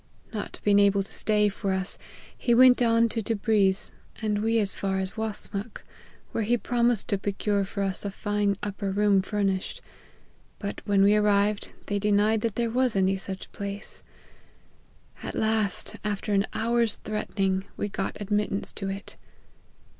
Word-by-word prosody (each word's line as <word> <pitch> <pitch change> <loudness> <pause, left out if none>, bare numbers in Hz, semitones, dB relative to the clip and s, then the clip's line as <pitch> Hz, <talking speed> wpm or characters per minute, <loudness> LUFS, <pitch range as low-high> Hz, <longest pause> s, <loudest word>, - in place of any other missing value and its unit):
Not 210 - -5
being 205 -1 +4
able 200 -1 +4
to - - -9
stay 210 -1 +3
for 195 -1 -2
us, 190 0 -2 0.4
he 240 - +1
went 255 0 +7
on 230 -1 +4
to 225 - -2
Tebriz, 205 -3 +1 0.3
and 210 -2 -1
we 225 +1 +2
as 205 -3 +4
far 195 -1 -2
as 190 0 -2
Wasmuch, 215 0 -4 0.5
where 225 - -1
he 240 +3 +2
promised 240 -2 +1
to 200 - +1
procure 200 0 0
for 200 +1 -3
us 195 -1 +3
a 200 - -2
fine 205 0 -1
upper 200 -1 -3
room 200 -1 +3
fur 205 +2 -2
nished; 190 -1 -1 0.8
but 200 -1 -5
when 200 -2 +3
we 200 +1 +5
arrived, 205 0 +2
they 205 0 -1
denied 210 +1 +2
that 225 -2 -2
there 235 -1 0
was 255 -1 +1
any 190 0 +2
such 190 0 -7
place; 200 +1 -6 1.2
at - - -5
last, 220 -3 0
after 205 0 -2
an 195 +1 +2
hour's 235 -1 +1
threatening, 195 -3 -2
we - - -1
got 195 -1 -4
admittance 205 -1 -1
to 195 -1 -4
it. 195 +1 -7
205 Hz, 160 wpm, -26 LUFS, 195-220 Hz, 1.2 s, went